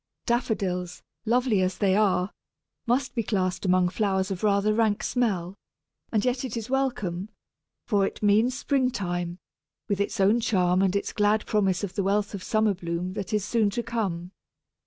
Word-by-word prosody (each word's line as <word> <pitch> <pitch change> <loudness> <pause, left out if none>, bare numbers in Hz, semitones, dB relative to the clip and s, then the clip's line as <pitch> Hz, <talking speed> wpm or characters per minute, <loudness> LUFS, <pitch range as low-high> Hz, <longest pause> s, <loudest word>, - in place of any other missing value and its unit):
Daffodils, 190 -7 -1 0.2
lovely 240 -3 +2
as 185 0 0
they 190 -2 +2
are, 200 -2 +2 0.6
must 250 +2 +1
be 235 - 0
classed 190 -3 -1
among 180 -1 +3
flowers 190 -1 0
of 190 +2 -4
rather 205 0 +3
rank 215 -2 +1
smell, 195 -8 0 0.6
and 215 0 +1
yet 250 0 0
it 245 -3 -4
is 230 +2 -5
welcome, 215 -9 -1 0.6
for 205 -3 +2
it - - -8
means 220 +5 +3
spring 270 -3 +1
time, 175 -5 -3 0.5
with 200 -2 0
its 200 +2 -2
own 200 +5 +4
charm 185 -6 +2
and 195 0 +2
its 200 - -1
glad 210 +1 +2
promise 195 -3 +1
of 195 - -3
the - - -1
wealth 205 +2 0
of 200 - -5
summer 215 +1 +2
bloom 175 0 -4
that 200 -2 -5
is 210 -2 0
soon 220 -1 +2
to 235 +4 -3
come. 190 -7 -3
205 Hz, 175 wpm, -26 LUFS, 185-225 Hz, 0.6 s, own